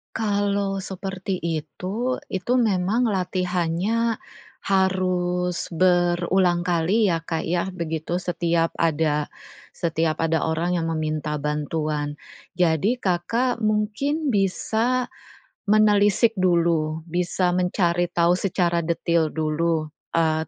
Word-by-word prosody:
Kalau 200 Hz, -2 st, 0 dB
seperti 190 Hz, 0 st, -4 dB
itu, 180 Hz, +9 st, -3 dB
itu 190 Hz, +6 st, -2 dB
memang 215 Hz, +2 st, +2 dB
latihannya 185 Hz, +3 st, 0 dB, 0.4 s
harus 180 Hz, -2 st, 0 dB
berulang 175 Hz, 0 st, +2 dB
kali 180 Hz, +6 st, +2 dB
ya, 165 Hz, -3 st, 0 dB
Kak, 165 Hz, -1 st, -3 dB
ya, 175 Hz, +2 st, -1 dB
begitu. 170 Hz, -1 st, -3 dB
Setiap 170 Hz, -2 st, 0 dB
ada 155 Hz, -2 st, 0 dB, 0.4 s
setiap 165 Hz, -1 st, -1 dB
ada 165 Hz, 0 st, +1 dB
orang 170 Hz, +3 st, 0 dB
yang 165 Hz, -1 st, -1 dB
meminta 155 Hz, -1 st, -2 dB
bantuan. 150 Hz, 0 st, -2 dB, 0.4 s
Jadi, 180 Hz, -, +2 dB
Kakak 230 Hz, +6 st, 0 dB
mungkin 215 Hz, +9 st, 0 dB
bisa 225 Hz, +6 st, 0 dB, 0.6 s
menelisik 210 Hz, +1 st, +4 dB
dulu, 165 Hz, -3 st, +1 dB
bisa 180 Hz, +1 st, 0 dB
mencari 175 Hz, -1 st, +1 dB
tahu 170 Hz, 0 st, +2 dB
secara 180 Hz, -2 st, +1 dB
detil 170 Hz, 0 st, +1 dB
dulu, 155 Hz, 0 st, 0 dB, 0.2 s
eee, 160 Hz, -1 st, +1 dB
175 Hz, 100 wpm, -23 LUFS, 165-195 Hz, 0.6 s, menelisik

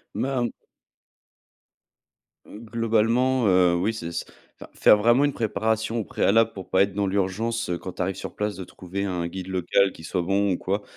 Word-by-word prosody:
Ben 125 Hz, -3 st, -1 dB, 2.0 s
Globalement, 115 Hz, +3 st, 0 dB
heu, 90 Hz, -2 st, +4 dB
oui, 95 Hz, +6 st, 0 dB
c'est 85 Hz, -6 st, -6 dB
c'est 85 Hz, -, -4 dB, 0.4 s
enfin, -, -, -11 dB
faire -, -, +5 dB
vraiment 120 Hz, +6 st, +4 dB
une 145 Hz, -, 0 dB
préparation 110 Hz, +1 st, -1 dB
au -, -, -1 dB
préalable 115 Hz, +3 st, +2 dB
pour 95 Hz, -2 st, -9 dB
pas 95 Hz, -, +4 dB
être 100 Hz, -1 st, +2 dB
dans 100 Hz, 0 st, 0 dB
l'urgence 100 Hz, +4 st, -1 dB
quand 95 Hz, -, -7 dB
tu -, -, -5 dB
arrives 95 Hz, +1 st, -1 dB
sur -, -, -8 dB
place 105 Hz, -1 st, -2 dB
de 95 Hz, -, -6 dB
trouver 90 Hz, +2 st, -6 dB
un 90 Hz, -3 st, -2 dB
guide 95 Hz, +1 st, -7 dB
local 95 Hz, +1 st, +1 dB
qui 80 Hz, -, -14 dB
soit 90 Hz, +2 st, -2 dB
bon 100 Hz, +2 st, +1 dB
ou -, -, -2 dB
quoi. 100 Hz, +3 st, -2 dB
100 Hz, 180 wpm, -24 LUFS, 95-115 Hz, 2.0 s, faire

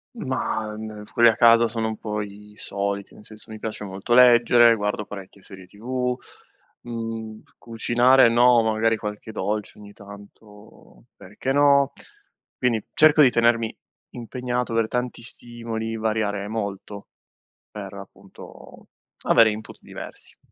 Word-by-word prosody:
Ma, 120 Hz, -, -3 dB
uhm, 110 Hz, -1 st, -8 dB
quelli 120 Hz, -1 st, +6 dB
a 110 Hz, -, 0 dB
casa 115 Hz, 0 st, +5 dB
sono 110 Hz, 0 st, -3 dB
un 110 Hz, -, -6 dB
po' 105 Hz, -1 st, -4 dB
i 105 Hz, +1 st, -11 dB
soliti, 100 Hz, -1 st, -4 dB
nel 105 Hz, -, -16 dB
senso 110 Hz, +1 st, -13 dB
mi 110 Hz, -, -8 dB
piace 110 Hz, -1 st, -6 dB
molto 100 Hz, +4 st, -4 dB
leggere, 120 Hz, -1 st, +6 dB
guardo 105 Hz, 0 st, -3 dB
parecchie 100 Hz, -1 st, -11 dB
serie 95 Hz, -2 st, -12 dB
TV, 125 Hz, +5 st, -3 dB, 0.7 s
mhmm, 115 Hz, -2 st, -6 dB, 0.2 s
cucinare 120 Hz, +2 st, +3 dB
no, 120 Hz, 0 st, +5 dB
magari 110 Hz, 0 st, +1 dB
qualche 105 Hz, +1 st, -7 dB
dolce 105 Hz, +1 st, -4 dB
ogni 105 Hz, -1 st, -13 dB
tanto, 105 Hz, +1 st, -16 dB
perché 105 Hz, +7 st, -5 dB
no, 140 Hz, -1 st, +4 dB, 0.7 s
quindi 115 Hz, -4 st, 0 dB
cerco 155 Hz, 0 st, +5 dB
di 130 Hz, -, +7 dB
tenermi 115 Hz, -1 st, +1 dB, 0.4 s
impegnato 125 Hz, 0 st, -4 dB
aver 115 Hz, -1 st, +1 dB
tanti 125 Hz, 0 st, -3 dB
stimoli, 115 Hz, -1 st, -5 dB
variare 110 Hz, -2 st, -2 dB
molto, 100 Hz, -2 st, -6 dB, 0.6 s
per 100 Hz, -1 st, -9 dB
appunto 100 Hz, 0 st, -14 dB, 0.4 s
avere 115 Hz, -1 st, +5 dB
input 110 Hz, +1 st, -9 dB
diversi. -, -, -11 dB
110 Hz, 130 wpm, -23 LUFS, 105-120 Hz, 0.7 s, di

